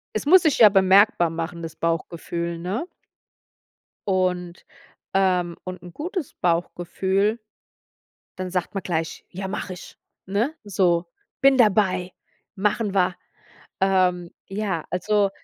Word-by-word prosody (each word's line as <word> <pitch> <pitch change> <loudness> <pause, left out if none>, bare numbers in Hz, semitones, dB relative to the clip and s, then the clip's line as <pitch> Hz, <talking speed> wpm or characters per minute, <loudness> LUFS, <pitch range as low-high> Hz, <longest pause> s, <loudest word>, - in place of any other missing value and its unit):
Es 215 - -2
muss 360 +4 +7
sich 315 -4 +2
ja 220 - +9
bemerkbar 195 -3 +4
machen, 165 +1 -5
das 165 -1 -7
Bauchgefühl, 170 +1 -3
ne? 190 - -3 1.2
Und, 180 -2 -1 0.5
ähm 180 -3 +2
und 185 -1 -7
'n 175 0 -11
gutes 335 - -5
Bauchgefühl, 190 +5 0 1.0
dann 185 0 -4
sagt 180 +1 -2
man 195 - -2
gleich: 165 -2 -3
„Ja, 190 +2 -5
mach 190 - -4
ich!" 180 -1 -9 0.3
Ne? 215 +10 0
so: 180 -4 +1 0.3
„Bin 275 0 +5
dabei, 190 -5 +3 0.4
machen 210 +1 0
wir.“ 185 -1 +2 0.7
Ähm, 185 -2 +2 0.2
ja, 195 -5 -3
also 205 +2 +1
185 Hz, 120 wpm, -23 LUFS, 175-205 Hz, 1.2 s, ja